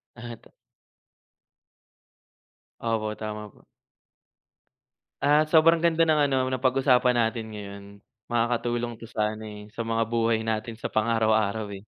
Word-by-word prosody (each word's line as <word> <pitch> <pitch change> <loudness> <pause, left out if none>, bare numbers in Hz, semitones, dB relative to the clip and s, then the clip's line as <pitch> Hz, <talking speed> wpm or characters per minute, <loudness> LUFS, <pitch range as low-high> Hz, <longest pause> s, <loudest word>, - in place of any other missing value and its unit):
Ah, 120 0 -8
ta - - -22 2.3
Opo, 110 -2 -1
tama 105 -1 -6
po. - - -24 1.6
At, 150 +2 +3
sobrang 165 +1 +5
ganda 165 -1 +3
ng 155 -1 +3
ano, 135 - +1
napag-usapan 130 -1 +3
natin 115 -1 0
ngayon. 100 -1 -8 0.5
Makakatulong 120 0 0
'to 115 - -10
sa 110 -2 -2
ano 110 - -10
eh, 105 -1 -9
sa 115 +2 -5
mga 115 0 +1
buhay 115 -1 +1
natin 110 +1 -3
sa - - -4
pang-araw-araw 110 -1 +1
eh. 95 - -11
115 Hz, 125 wpm, -26 LUFS, 110-125 Hz, 2.3 s, sobrang